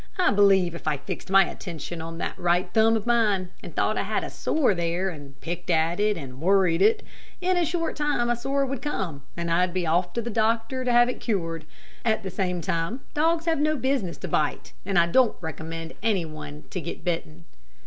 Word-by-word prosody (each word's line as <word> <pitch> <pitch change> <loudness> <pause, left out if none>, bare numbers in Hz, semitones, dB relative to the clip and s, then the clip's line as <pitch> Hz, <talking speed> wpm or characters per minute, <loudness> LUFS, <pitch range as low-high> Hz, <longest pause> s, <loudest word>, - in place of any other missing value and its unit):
I 365 - +4
believe 195 -4 +4
if 170 - -8
I 150 -2 +1
fixed 140 +5 -7
my 195 0 +6
attention 170 -2 -6
on 165 0 -6
that - - -3
right 175 +1 +2
thumb 225 +1 +5
of 220 - -2
mine, 210 -6 +2
and - - -10
thought - - +1
I - - +2
had - - -1
a - - -5
sore 285 -9 +1
there, 175 +2 -1
and 140 -4 -11
picked 175 +2 -5
at 165 +2 +2
it 210 0 +2
and 135 -3 -8
worried 185 -1 +3
it, 215 +3 +4 0.4
in 370 0 +1
a 350 - +3
short 330 0 -1
time 295 -5 +1
a 240 - +2
sore 275 +3 0
would 270 -1 -4
come, 185 - -3 0.2
and 170 0 -2
I'd 180 +1 +2
be 180 -2 0
off 175 +2 +1
to 235 - -1
the 235 - -4
doctor 225 +4 0
to 250 - +1
have 240 0 +6
it 250 - -3
cured. 165 -8 -2 0.4
At 220 -1 +1
the 190 - -4
same 180 -2 -1
time 165 - -2
dogs 325 +2 +2
have 325 -3 +1
no 305 +1 +2
business 260 - -1
to 185 - -6
bite, 150 -3 -1
and 195 -3 +1
I 170 - +6
don't 240 +7 +3
recommend 165 0 -6
any 205 -6 +1
one 155 -1 -8
to 185 - -3
get - - -6
bitten." 165 -2 -3
190 Hz, 220 wpm, -26 LUFS, 165-240 Hz, 0.4 s, my